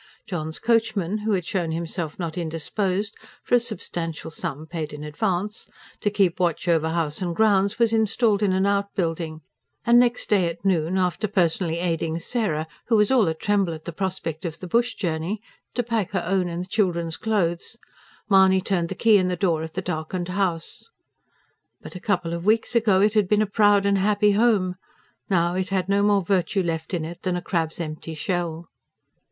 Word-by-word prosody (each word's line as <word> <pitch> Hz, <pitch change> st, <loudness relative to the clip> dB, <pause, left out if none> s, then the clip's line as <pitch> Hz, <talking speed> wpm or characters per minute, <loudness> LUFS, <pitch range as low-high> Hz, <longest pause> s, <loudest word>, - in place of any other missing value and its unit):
John's 160 Hz, -4 st, -4 dB
coachman, 215 Hz, -4 st, +1 dB
who 210 Hz, 0 st, 0 dB
had 180 Hz, -4 st, 0 dB
shown 180 Hz, -5 st, -1 dB
himself 165 Hz, -1 st, -3 dB
not 170 Hz, -3 st, -4 dB
indisposed 185 Hz, +5 st, -2 dB, 0.3 s
for -, -, -5 dB
a 245 Hz, -, +7 dB
substantial 170 Hz, -8 st, -4 dB
sum, 155 Hz, -1 st, -5 dB
paid 160 Hz, -2 st, -5 dB
in 150 Hz, 0 st, -7 dB
advance 190 Hz, +6 st, -2 dB, 0.3 s
to 205 Hz, -, +1 dB
keep 195 Hz, -4 st, +1 dB
watch 175 Hz, -1 st, 0 dB
over 160 Hz, -2 st, +2 dB
house 160 Hz, 0 st, -1 dB
and 175 Hz, -2 st, -2 dB
grounds, 200 Hz, -1 st, +3 dB
was 230 Hz, -1 st, +3 dB
installed 220 Hz, -1 st, +2 dB
in 205 Hz, -2 st, +2 dB
an 190 Hz, +1 st, +2 dB
outbuilding, 175 Hz, -5 st, -1 dB, 0.4 s
and 235 Hz, +1 st, +6 dB
next 245 Hz, 0 st, +2 dB
day 195 Hz, -5 st, +3 dB
at 170 Hz, +3 st, -9 dB
noon, 180 Hz, -1 st, +1 dB
after 185 Hz, +3 st, 0 dB
personally 175 Hz, -3 st, +1 dB
aiding 165 Hz, -2 st, -1 dB
Sarah, 170 Hz, -4 st, -1 dB, 0.2 s
who 230 Hz, -, +3 dB
was 210 Hz, +1 st, +4 dB
all 240 Hz, -8 st, +4 dB
a 160 Hz, -, 0 dB
tremble 195 Hz, -2 st, 0 dB
at 155 Hz, -, -12 dB
the 170 Hz, -, -5 dB
prospect 180 Hz, -3 st, -3 dB
of 165 Hz, -3 st, -4 dB
the -, -, -8 dB
bush 235 Hz, +7 st, +1 dB
journey, 170 Hz, +3 st, -2 dB, 0.4 s
to 245 Hz, -, +1 dB
pack 225 Hz, -4 st, -1 dB
her 185 Hz, -, 0 dB
own 185 Hz, 0 st, +1 dB
and 170 Hz, +1 st, -3 dB
the -, -, -11 dB
children's 170 Hz, -6 st, 0 dB
clothes, 200 Hz, -1 st, -1 dB, 0.5 s
Mahony 190 Hz, -2 st, +5 dB
turned 180 Hz, -3 st, -1 dB
the -, -, -4 dB
key 220 Hz, -2 st, +5 dB
in 185 Hz, -, +1 dB
the 180 Hz, -, 0 dB
door 170 Hz, -3 st, +1 dB
of 160 Hz, 0 st, -6 dB
the 190 Hz, -, -3 dB
darkened 175 Hz, +1 st, -3 dB
house. 180 Hz, -, -2 dB, 0.9 s
But -, -, -11 dB
a -, -, -5 dB
couple 180 Hz, -4 st, -1 dB
of 170 Hz, 0 st, -4 dB
weeks 220 Hz, +4 st, +2 dB
ago 210 Hz, -5 st, +4 dB
it 210 Hz, +1 st, +3 dB
had 210 Hz, -3 st, +3 dB
been 210 Hz, 0 st, +4 dB
a -, -, 0 dB
proud 205 Hz, -1 st, +3 dB
and 200 Hz, -1 st, +3 dB
happy 205 Hz, +1 st, +3 dB
home. 200 Hz, -4 st, +2 dB, 0.5 s
Now 175 Hz, -2 st, +2 dB
it 185 Hz, 0 st, -2 dB
had 190 Hz, -2 st, 0 dB
no 200 Hz, 0 st, +2 dB
more 205 Hz, -1 st, +3 dB
virtue 185 Hz, +1 st, +1 dB
left 165 Hz, +1 st, -2 dB
in 160 Hz, -3 st, -2 dB
it 170 Hz, +1 st, -8 dB
than 185 Hz, -1 st, -1 dB
a 180 Hz, -, -2 dB
crab's 165 Hz, -3 st, -2 dB
empty 160 Hz, 0 st, -5 dB
shell. 170 Hz, 0 st, -2 dB
185 Hz, 195 wpm, -24 LUFS, 165-205 Hz, 0.9 s, a